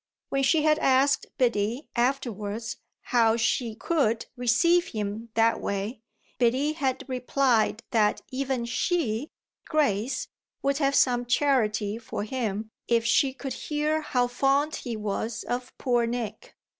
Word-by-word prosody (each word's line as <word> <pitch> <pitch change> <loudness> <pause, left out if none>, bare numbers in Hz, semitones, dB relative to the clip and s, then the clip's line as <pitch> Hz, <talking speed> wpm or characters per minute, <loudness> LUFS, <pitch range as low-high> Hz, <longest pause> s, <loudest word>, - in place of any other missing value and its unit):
When 275 - 0
she 300 +3 +3
had 305 0 +3
asked 270 +1 +3
Biddy 235 +2 0
afterwards 230 -3 -1 0.4
how 230 -2 +4
she 225 0 0
could 235 -5 0
receive 335 +9 +3
him 215 +2 -4
that 230 0 +3
way 200 +3 -3 0.4
Biddy 260 +5 +2
had 265 -4 -1
replied 250 -3 +1
that 215 -4 +2
even 260 -2 -1
she, 245 -1 -1 0.4
Grace, 255 -4 0 0.4
would 275 +1 +1
have 280 -1 +2
some 245 -1 +3
charity 225 -5 +1
for 225 -2 -5
him 220 -2 -3 0.2
if 230 -1 +2
she 265 +3 +3
could 265 -1 -6
hear 305 +3 -1
how 250 -5 +1
fond 275 +5 +1
he 235 -3 -5
was 215 +2 -3
of 245 +1 -4
poor 240 -3 +1
Nick. 235 -2 -5
245 Hz, 130 wpm, -27 LUFS, 225-275 Hz, 0.4 s, how